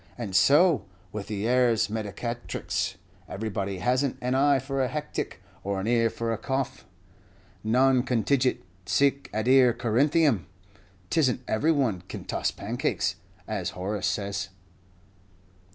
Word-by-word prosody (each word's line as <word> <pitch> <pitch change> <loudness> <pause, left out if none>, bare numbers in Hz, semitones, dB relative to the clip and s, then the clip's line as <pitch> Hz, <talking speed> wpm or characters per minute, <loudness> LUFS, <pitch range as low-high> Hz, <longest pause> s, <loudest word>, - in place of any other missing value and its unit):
And 105 -6 -5
so 145 - +5 0.3
with 105 0 -5
the 105 0 -2
ars 120 -3 +3
medicatrix 105 -2 -3 0.3
everybody 100 -2 -3
has 125 +8 +1
n't 140 - -2
an 125 +1 -1
eye 140 +1 +4
for 135 +1 -2
a 130 - +2
hectic, 150 +3 -4 0.2
or 100 0 -2
an 95 - -3
ear 115 0 +3
for 115 0 -2
a 110 - -4
cough 135 +2 -3 0.8
non 130 +3 +4
contigit 125 +1 +1 0.2
cuique 140 0 +2
adire 125 +3 +4
Corintheum. 135 - +2 0.6
'T - - +2
is 135 -5 +4
n't 125 - -6
every 145 +10 +2
one 125 - +1
can - - -7
toss - - -1
pancakes, - - -2 0.3
as - - -2
Horace 100 +3 -2
says." 100 -1 -2
120 Hz, 135 wpm, -27 LUFS, 105-135 Hz, 0.8 s, so